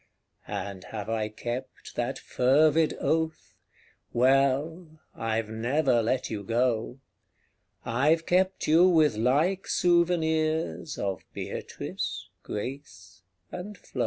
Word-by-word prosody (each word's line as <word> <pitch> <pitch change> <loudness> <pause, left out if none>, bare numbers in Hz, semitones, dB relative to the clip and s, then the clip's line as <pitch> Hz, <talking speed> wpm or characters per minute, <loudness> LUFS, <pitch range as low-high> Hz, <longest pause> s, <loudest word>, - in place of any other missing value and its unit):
And 95 -1 -5
have 105 -1 -6
I 110 -1 -1
kept 120 +4 -6
that 120 +3 -2
fervid 150 +5 +3
oath? 160 -9 -1 0.6
Well 140 +6 +2
I've 110 -1 -2
never 120 +3 +1
let 125 +3 0
you 105 -2 -3
go: 115 +2 0 0.9
I've 150 +7 +2
kept 185 +1 +1
you 165 +4 +6
with 155 -8 +4
like 150 - +1
souvenirs 160 -3 +1
Of 95 -2 -3
Beatrice, - - -5
Grace 105 -5 -7 0.3
and 195 +3 -7
Flo. - - -10
135 Hz, 100 wpm, -27 LUFS, 115-160 Hz, 0.9 s, you